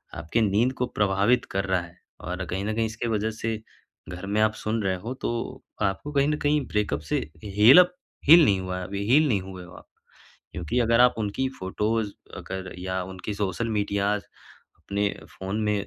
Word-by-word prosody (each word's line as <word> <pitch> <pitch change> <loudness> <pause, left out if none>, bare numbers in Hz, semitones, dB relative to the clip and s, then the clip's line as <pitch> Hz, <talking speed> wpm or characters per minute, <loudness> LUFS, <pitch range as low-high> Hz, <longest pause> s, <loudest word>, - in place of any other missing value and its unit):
आपकी 80 +10 -1
नींद 110 +5 +2
को 125 - +3
प्रभावित 105 +4 +2
कर 95 0 -1
रहा 95 -1 +1
है। 85 0 -13 0.2
और 90 +2 -4
कहीं 95 +4 -3
न 110 - -1
कहीं 115 0 +1
इसके 110 +2 -4
वजह 110 -1 0
से 110 -1 -2 0.5
घर 90 +2 -7
में 100 +2 0
आप 110 0 +3
सुन 110 +1 -2
रहे 95 -1 +1
हो, 110 +8 -5
तो 120 -2 -4 0.2
आपको 100 +9 -1
कहीं 140 0 +3
न 150 0 +1
कहीं 145 0 +3
ब्रेकअप 105 -9 0
से - - +2 0.3
हील 105 - +7
अप 180 0 +5 0.3
हील 165 +3 +10
नहीं 100 -5 +3
हुआ 90 0 -4
है - - -5
अभी, 100 +2 -4
हील 155 +3 +6
नहीं 105 -8 +1
हुए 95 -1 -9
हो 90 - -13
आप। - - -13 0.7
क्योंकि 90 +7 -2
अगर 115 0 +3
आप 125 0 +6
उनकी 110 +5 -1
फोटोज़ 105 +3 -1 0.3
अगर 95 -1 -6
या 95 0 -2
उनकी 95 +3 -6
सोशल 100 +3 -2
मीडियाज़ 100 -1 0 0.5
अपने 100 +1 -1 0.3
फ़ोन 95 +3 -3
में 105 -1 0
105 Hz, 195 wpm, -26 LUFS, 95-115 Hz, 0.7 s, हील